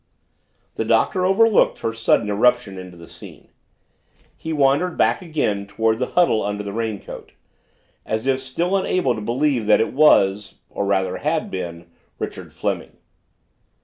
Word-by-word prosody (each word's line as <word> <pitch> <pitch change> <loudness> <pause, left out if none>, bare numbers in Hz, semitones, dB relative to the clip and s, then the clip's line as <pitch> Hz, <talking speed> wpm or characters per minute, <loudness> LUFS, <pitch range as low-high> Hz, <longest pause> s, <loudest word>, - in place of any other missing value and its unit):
The - - 0
Doctor 185 -2 +2
overlooked 220 +3 +3
her 115 - -2
sudden 115 -2 +1
eruption 105 -1 +1
into 90 -1 -11
the 85 - -12
scene. - - -14 0.9
He 160 - -6
wandered 145 +4 +1
back - - +2
again 145 - -2
toward 110 +2 0
the 125 - -1
huddle 170 -11 +4
under 105 0 -3
the 100 -1 -6
raincoat, 110 -2 -6 0.7
as 110 +2 -3
if 135 -1 +1
still 165 +9 -2
unable 185 -8 +1
to 110 - -6
believe 120 +1 0
that 105 - +5
it 115 - -1
was 105 -8 +3 0.2
or 100 - -3
rather 95 -2 0
had 155 +1 -2
been 85 -2 -6 0.3
Richard - - -7
Fleming. - - -4
115 Hz, 145 wpm, -21 LUFS, 100-150 Hz, 0.9 s, that